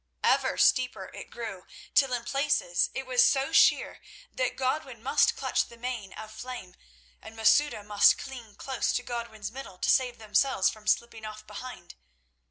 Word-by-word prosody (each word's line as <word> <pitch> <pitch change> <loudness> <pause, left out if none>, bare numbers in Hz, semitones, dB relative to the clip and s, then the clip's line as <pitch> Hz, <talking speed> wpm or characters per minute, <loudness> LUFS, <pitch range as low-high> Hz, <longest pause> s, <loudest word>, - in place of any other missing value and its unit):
Ever - - +2
steeper 255 -1 +2
it - - -9
grew, 220 -6 -7 0.3
till 270 -2 +4
in 245 -2 -2
places 275 -9 +1
it 265 - -3
was 250 -1 +4
so 275 +2 +2
sheer - - +4 0.3
that - - -1
Godwin 260 -3 -2
must 265 - +3
clutch - - 0
the 235 - -14
mane 235 -5 -5
of 215 0 -9
Flame, 245 -6 -8 0.5
and 225 - -11
Masouda 225 +1 +3
must 205 0 +5
cling 240 -6 -9
close 265 -1 -2
to 245 - -1
Godwin's 230 -4 -5
middle 250 -7 -9
to - - -1
save 250 -2 +2
themselves 220 0 +2
from 215 -1 -14
slipping 230 -1 0
off 215 0 -8
behind. 250 - -9
240 Hz, 165 wpm, -28 LUFS, 215-260 Hz, 0.5 s, must